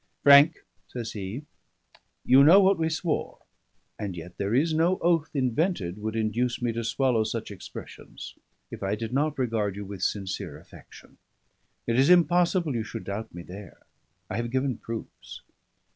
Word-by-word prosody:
"Frank," 145 +3 +7 0.2
says 120 -3 -6
he, 105 +7 -6 0.8
"you 130 +2 +7
know 170 +7 +8
what 195 -2 +4
we 160 0 +1
swore; 160 0 -2 0.6
and 100 -4 -4
yet 90 +2 -9
there 100 +3 0
is 155 +5 +2
no 170 +4 +2
oath 165 -2 +1
invented 130 - -1
would 110 +1 -4
induce 115 +2 -1
me 120 -1 -1
to 115 +1 -4
swallow 120 0 +1
such 110 0 -4
expressions, 100 - -10 0.4
if - - -8
I 95 +1 -1
did 115 +2 -5
not 150 +2 0
regard 110 -6 -1
you 100 0 -6
with 100 -2 -8
sincere 95 -1 -3
affection. - - -16 0.7
It 115 +1 +1
is 135 - +4
impossible 175 -2 +3
you 115 -2 -1
should 115 0 -7
doubt 110 +3 -5
me 85 0 -9
there: 95 +2 -12 0.4
I - - -4
have 120 0 -2
given 130 -1 -1
proofs. 115 -1 -8
120 Hz, 160 wpm, -26 LUFS, 105-155 Hz, 0.8 s, know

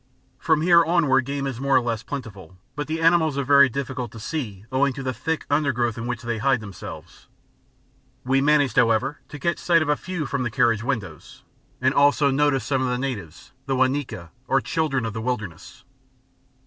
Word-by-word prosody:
From 160 -2 +1
here 170 -1 +6
onward 150 -6 +2
game 140 0 -3
is 130 -3 -4
more 140 0 +1
or - - +7
less 115 -3 -2
plentiful, 100 - -8 0.2
but 145 +1 -4
the 160 +1 -2
animals 165 -3 +3
are 140 - 0
very 140 0 +6
difficult 130 -2 -4
to 115 - -9
see 110 - -5
owing 135 +1 +2
to 135 - -7
the 130 0 -2
thick 160 +4 -3
undergrowth 130 -6 0
in 115 0 -5
which 125 -1 -4
they 120 -2 -3
hide 135 +1 +2
themselves. 100 -4 -10 1.0
We 135 +1 +2
managed, 145 -4 +2
however, 115 +4 +2
to 150 - -8
catch 170 +4 -1
sight 170 -2 +3
of 150 - -4
a 150 - +3
few 175 -1 -5
from 140 -1 -2
the 125 - -1
carriage 115 0 +2
windows, 110 - -5 0.4
and 130 +1 +2
also 145 0 +4
noticed 140 -1 +1
some 135 -2 0
of 130 - 0
the 125 0 -1
natives, 125 - -6 0.2
the 135 - 0
Wa 130 0 +4
Nyika, 130 - -4 0.2
or 135 - +3
"children 135 -4 -1
of 110 - -4
the 110 - -4
wilderness." 110 -9 -5
135 Hz, 200 wpm, -23 LUFS, 120-145 Hz, 1.0 s, or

